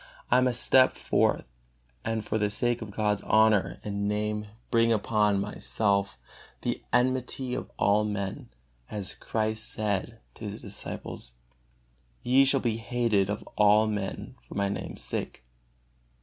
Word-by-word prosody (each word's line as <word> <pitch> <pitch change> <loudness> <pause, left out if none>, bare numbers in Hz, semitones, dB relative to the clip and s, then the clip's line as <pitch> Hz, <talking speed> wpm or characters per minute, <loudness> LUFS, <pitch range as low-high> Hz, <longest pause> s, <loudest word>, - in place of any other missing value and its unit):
I 125 +1 +6
must 125 -2 +1
step 130 -1 +5
forth - - +1 0.6
and 115 -1 -2
for 110 - -1
the 105 -1 +1
sake 120 +3 +1
of 110 - -6
God's 105 0 0
honor 110 -2 +3
and 100 0 -2
Name 105 0 -1 0.2
bring 115 -1 +4
upon 105 -2 +2
myself 100 - -1 0.5
the - - -2
enmity 130 +1 0
of 125 - -4
all 105 +1 +3
men, 100 -2 -4 0.4
as 100 -3 -5
Christ 110 0 -1
said 110 +1 -2
to 110 - -9
His 105 +2 -5
disciples: 100 - -7 0.9
"Ye 130 +2 +5
shall 135 0 +3
be 115 -3 0
hated 115 -4 +1
of 105 - -4
all 105 +1 +5
men 105 -3 -3
for - - -12
My 100 0 +1
Name's 100 - -5
sake." - - -4
105 Hz, 140 wpm, -28 LUFS, 100-115 Hz, 0.9 s, I